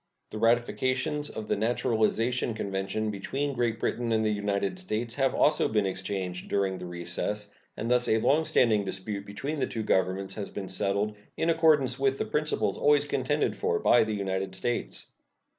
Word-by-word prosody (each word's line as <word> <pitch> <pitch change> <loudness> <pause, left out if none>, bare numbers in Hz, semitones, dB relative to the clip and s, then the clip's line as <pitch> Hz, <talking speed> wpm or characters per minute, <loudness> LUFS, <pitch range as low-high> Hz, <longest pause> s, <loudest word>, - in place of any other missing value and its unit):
The 110 - -5
ratifications 130 +6 +1
of 110 -1 -6
the - - +1
naturalization 115 +1 +1
convention 100 +1 -2
between 135 +8 -3
Great 120 -2 0
Britain 120 0 -1
and 110 0 +2
the 110 - +2
United 100 - -1
States 115 -10 -2
have 135 0 +1
also 150 0 +3
been 105 -2 +1
exchanged 95 -1 -3
during 95 -2 0
the 90 - -6
recess, 90 +4 -3 0.3
and 115 +3 -2
thus 125 0 +4
a 110 - +3
long 150 +8 +3
standing 110 -8 +3
dispute 100 +1 -4
between 140 +10 -4
the - - +1
two 110 - -4
Governments 95 0 0
has 105 -2 -5
been 100 -2 -6
settled 100 +2 0 0.2
in 165 - +2
accordance 150 -5 +3
with 135 0 +2
the - - -1
principles 150 -10 0
always 145 -1 +4
contended 145 +1 0
for 445 0 0
by 120 - +5
the 110 -1 -2
United 95 -1 -2
States. 120 +5 -2
110 Hz, 175 wpm, -28 LUFS, 100-130 Hz, 0.3 s, by